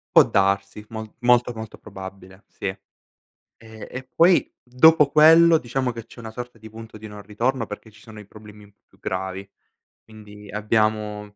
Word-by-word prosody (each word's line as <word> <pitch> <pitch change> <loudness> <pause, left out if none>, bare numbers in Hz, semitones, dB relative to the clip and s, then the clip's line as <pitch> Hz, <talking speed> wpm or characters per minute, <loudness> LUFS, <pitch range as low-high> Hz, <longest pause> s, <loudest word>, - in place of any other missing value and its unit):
Può - - +10
darsi, 100 +1 0
mol 110 -1 -7
molto, 120 0 +3
molto 110 -1 -9
probabile, 95 -1 -11
sì. - - -10 0.8
Ehm, 110 -1 -14
e 130 - -7
poi 170 +2 +3
dopo 150 +4 +5
quello 165 +2 +7
diciamo 125 -1 -2
che 115 -1 -9
c'è - - -17
una 110 -1 -8
sorta 125 0 -8
di 110 0 -12
punto 110 0 -12
di 110 - -10
non 105 -1 -10
ritorno 115 +5 -2
perché 105 +1 -10
ci 110 - -19
sono 110 -1 -13
i 105 - -12
problemi 105 0 -15
un 100 - -20
po' - - -51
più - - -27
gravi. 95 +1 -5 0.6
Quindi 105 -1 -14
abbiamo, 105 0 0
110 Hz, 175 wpm, -23 LUFS, 105-120 Hz, 0.8 s, Può